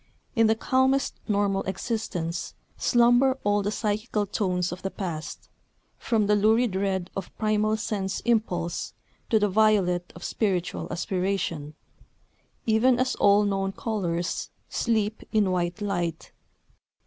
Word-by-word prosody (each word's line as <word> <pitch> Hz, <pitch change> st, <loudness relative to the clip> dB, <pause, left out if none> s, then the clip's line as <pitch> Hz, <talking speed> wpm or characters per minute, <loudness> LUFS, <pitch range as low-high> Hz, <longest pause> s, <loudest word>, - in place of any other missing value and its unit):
In 225 Hz, -2 st, +5 dB
the 220 Hz, -, +3 dB
calmest 260 Hz, +3 st, +2 dB
normal 200 Hz, -2 st, +1 dB
existence 190 Hz, -4 st, -3 dB, 0.2 s
slumber 245 Hz, +2 st, +4 dB
all 205 Hz, 0 st, +2 dB
the 200 Hz, -, -1 dB
psychical 215 Hz, 0 st, -1 dB
tones 180 Hz, -3 st, -1 dB
of 180 Hz, -, -6 dB
the 195 Hz, -, -2 dB
past, 170 Hz, -6 st, -6 dB, 0.5 s
from 220 Hz, -3 st, +1 dB
the 210 Hz, +1 st, +3 dB
lurid 220 Hz, +1 st, +3 dB
red 190 Hz, -2 st, -1 dB
of 195 Hz, -2 st, -4 dB
primal 215 Hz, 0 st, +1 dB
sense 200 Hz, -3 st, -2 dB
impulse 180 Hz, -8 st, -1 dB, 0.3 s
to 225 Hz, -, +4 dB
the 210 Hz, -1 st, +3 dB
violet 195 Hz, -4 st, +2 dB
of -, -, -10 dB
spiritual 185 Hz, -5 st, -1 dB
aspiration, 175 Hz, -4 st, -2 dB, 0.9 s
even 235 Hz, +3 st, +4 dB
as 255 Hz, +1 st, +1 dB
all 205 Hz, +1 st, +5 dB
known 195 Hz, -1 st, -1 dB
colours 180 Hz, -8 st, -2 dB, 0.2 s
sleep 220 Hz, -2 st, 0 dB
in 205 Hz, -4 st, +2 dB
white 175 Hz, +2 st, -1 dB
light. 175 Hz, -5 st, -2 dB
205 Hz, 125 wpm, -26 LUFS, 185-220 Hz, 0.9 s, In